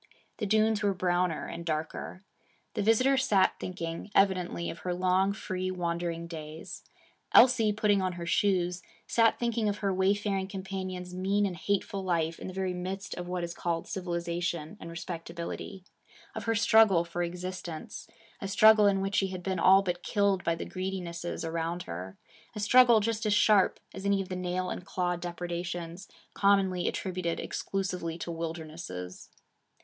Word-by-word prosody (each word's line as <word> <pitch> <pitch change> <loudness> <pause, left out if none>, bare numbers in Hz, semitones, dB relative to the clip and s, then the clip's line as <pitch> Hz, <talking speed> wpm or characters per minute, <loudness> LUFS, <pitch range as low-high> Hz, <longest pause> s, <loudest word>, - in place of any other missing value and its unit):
The 210 - -2
dunes 215 +1 +3
were 200 -2 +1
browner 180 -2 0
and 170 0 -6
darker. 160 +3 -4 0.5
The 210 - -1
visitor 255 +6 +4
sat 205 -7 +3
thinking, 170 0 -5
evidently, 185 -3 +2
of 170 - -10
her 180 -1 -2
long, 185 +2 +2
free 185 -2 -3
wandering 170 -2 -2
days. 160 -1 -8 0.5
Elsie, 240 -4 +7
putting 205 -1 +2
on 185 -1 -1
her 175 -1 -6
shoes, 180 -1 +1 0.2
sat 230 -1 +3
thinking 235 -2 0
of 205 - -2
her 195 -2 0
wayfaring 195 0 +1
companion's 185 -2 -5
mean 195 +3 +1
and 190 -3 -2
hateful 195 +2 -1
life 165 -3 0
in - - -6
the - - -5
very 190 -1 -1
midst 190 +2 -5
of 175 0 -6
what 180 -1 -2
is 170 0 -4
called 170 -1 -2
civilization 170 -3 -3
and 165 - -8
respectability; 170 +2 -6 0.5
of - - -6
her 225 0 +1
struggle 210 -5 +5
for 170 +1 -4
existence 175 -1 -5 0.3
a 195 - -3
struggle 215 +1 +6
in 195 -1 +2
which 195 +1 -2
she 195 - +3
had 185 -1 -6
been 190 0 -1
all 195 +1 +6
but 175 -2 -2
killed 200 -3 +1
by 170 - +1
the - - -5
greedinesses 175 -3 -4
around 165 +2 -2
her; 90 +3 -7 0.4
a - - -4
struggle 240 +1 +6
just 225 +1 -1
as 210 - +3
sharp 205 -2 +4
as 190 - -7
any 200 0 +2
of 195 - -4
the 185 - -3
nail 180 0 -2
and - - -5
claw 180 -1 -1
depredations 175 +1 -5 0.3
commonly 195 -3 +2
attributed 180 -3 -2
exclusively 180 -4 -3
to 170 - -5
wilder 165 0 -4
nesses. 90 - -8
185 Hz, 165 wpm, -29 LUFS, 170-200 Hz, 0.5 s, Elsie